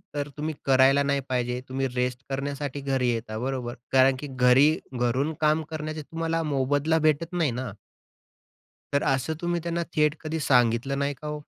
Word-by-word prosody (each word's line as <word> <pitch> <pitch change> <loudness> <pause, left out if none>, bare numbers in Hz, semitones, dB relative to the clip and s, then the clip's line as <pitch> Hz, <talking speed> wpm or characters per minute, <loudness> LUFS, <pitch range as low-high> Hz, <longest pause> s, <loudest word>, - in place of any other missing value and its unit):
तर 145 0 -2
तुम्ही 155 +1 -2
करायला 135 +1 +5
नाही 140 0 +1
पाहिजे, 125 -1 -1
तुम्ही 135 +1 -1
रेस्ट 125 +1 -1
करण्यासाठी 140 +1 -3
घरी 135 -2 0
येता, 115 -2 -4
बरोबर. 125 -1 -3 0.2
कारण 130 0 +5
की 145 - -6
घरी, 130 +2 +5 0.3
घरून 130 +6 +1
काम 155 +1 +3
करण्याचे 155 0 -4
तुम्हाला 165 +2 -2
मोबदला 145 +2 +1
भेटत 155 +2 +1
नाही 165 -7 +1
ना. 125 -2 -4 1.2
तर 140 - +2
असं 135 +4 -2
तुम्ही 175 0 -1
त्यांना 170 0 -2
थेट 150 -1 +3
कधी 160 0 -3
सांगितलं 125 +1 +2
नाही 140 0 0
का 150 - -4
ओ? 150 0 -4
140 Hz, 165 wpm, -26 LUFS, 130-155 Hz, 1.2 s, करायला